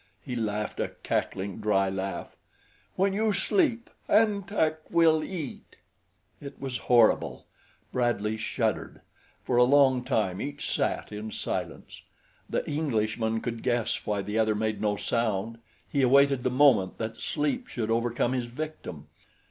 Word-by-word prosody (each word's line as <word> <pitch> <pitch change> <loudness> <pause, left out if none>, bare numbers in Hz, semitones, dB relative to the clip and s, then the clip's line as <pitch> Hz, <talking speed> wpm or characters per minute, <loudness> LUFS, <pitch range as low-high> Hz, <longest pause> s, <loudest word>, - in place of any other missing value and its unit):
He 125 - -4
laughed, 105 -2 -2
a - - +1 0.2
cackling, 95 +1 -2
dry 105 -2 +2
laugh. 95 0 -4 0.6
"When 195 +1 +2
you 215 +1 +1
sleep, 240 - +1 0.2
An 210 -2 +4
Tak 160 -6 -1
will 160 -2 +4
eat." 165 -8 -7 0.7
It 140 - -9
was 130 -3 -3
horrible. 120 -3 +4 0.5
Bradley 115 -4 0
shuddered. 110 0 -2 0.4
For 125 - 0
a 125 - +7
long 130 -1 +4
time 100 -6 0
each 145 +1 -4
sat - - -1
in 105 +1 -5
silence. - - -5 0.5
The - - -1
Englishman 115 -6 0
could 115 -2 -4
guess 120 -3 0
why 105 -2 -1
the 105 +3 -2
other 110 -1 +2
made 110 -1 -1
no 105 -1 +1
sound 115 -1 -1 0.3
he 140 - 0
awaited 140 +1 +5
the 130 - +1
moment 125 -8 +4
that 110 0 -5
sleep 160 - -1
should 115 - -3
overcome 120 +2 +1
his 125 -2 -1
victim. 120 - -7
120 Hz, 140 wpm, -28 LUFS, 110-145 Hz, 0.7 s, a